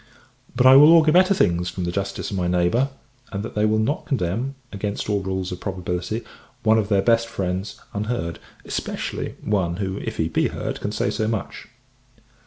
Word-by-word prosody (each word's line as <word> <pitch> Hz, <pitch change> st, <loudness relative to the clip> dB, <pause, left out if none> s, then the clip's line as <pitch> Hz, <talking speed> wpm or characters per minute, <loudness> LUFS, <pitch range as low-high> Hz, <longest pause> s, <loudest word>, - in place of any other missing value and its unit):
But 125 Hz, +1 st, +2 dB
I 130 Hz, +1 st, +9 dB
will 150 Hz, +4 st, +9 dB
augur 160 Hz, -2 st, +6 dB
better 185 Hz, +4 st, +5 dB
things 90 Hz, -, +1 dB
from 90 Hz, -, -5 dB
the 85 Hz, -, -1 dB
justice 100 Hz, +2 st, -3 dB
of 100 Hz, -, -2 dB
my 90 Hz, -1 st, 0 dB
neighbour; 90 Hz, +10 st, +2 dB, 0.4 s
and 100 Hz, +1 st, -3 dB
that -, -, -6 dB
they 105 Hz, 0 st, +1 dB
will 110 Hz, 0 st, +2 dB
not 120 Hz, +8 st, -1 dB
condemn, 125 Hz, -, -1 dB, 0.2 s
against 100 Hz, 0 st, -3 dB
all 100 Hz, -, +2 dB
rules 95 Hz, -1 st, -3 dB
of 90 Hz, -, -5 dB
probability, 90 Hz, +3 st, -3 dB, 0.4 s
one 110 Hz, 0 st, +4 dB
of 105 Hz, -1 st, -2 dB
their 100 Hz, -2 st, +3 dB
best 115 Hz, +1 st, +3 dB
friends, 95 Hz, -1 st, -3 dB
unheard: 105 Hz, -5 st, -3 dB, 0.3 s
especially, -, -, -4 dB
one 95 Hz, -5 st, 0 dB
who, 95 Hz, 0 st, -3 dB
if -, -, -5 dB
he -, -, +1 dB
be -, -, +1 dB
heard, -, -, -5 dB
can -, -, -2 dB
say -, -, -1 dB
so 110 Hz, -, -1 dB
much. 110 Hz, -3 st, -4 dB
100 Hz, 190 wpm, -23 LUFS, 90-115 Hz, 0.4 s, I